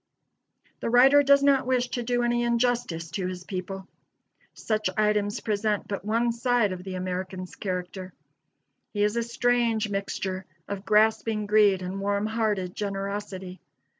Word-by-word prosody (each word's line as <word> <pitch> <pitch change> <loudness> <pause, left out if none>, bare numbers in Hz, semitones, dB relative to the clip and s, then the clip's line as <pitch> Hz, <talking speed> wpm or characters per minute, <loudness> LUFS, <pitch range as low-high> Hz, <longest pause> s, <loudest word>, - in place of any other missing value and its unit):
The - - -2
writer 265 +4 +7
does 280 0 +5
not 275 -2 +3
wish 250 -1 +1
to 245 - -2
do 245 +1 0
any 240 0 +1
injustice 235 -8 0
to 185 0 -2
his 180 -1 -6
people. 190 +1 -6 0.7
Such 215 -1 -1
items 210 -1 +1
present 210 -1 -1
but 200 -2 -4
one 230 +3 +1
side 235 -3 +1
of 180 -1 -6
the 190 -1 -6
American's 185 0 -4
character. 185 -1 -4 0.8
He 205 -1 +1
is 210 +2 +1
a 235 - +1
strange 235 -2 +1
mixture 195 -1 -3 0.2
of 200 0 -5
grasping 215 0 +2
greed 205 -3 +4
and 190 +2 -4
warm 200 +1 0
hearted 215 -5 -1
generosity. 195 -2 -5
210 Hz, 145 wpm, -26 LUFS, 190-235 Hz, 0.8 s, writer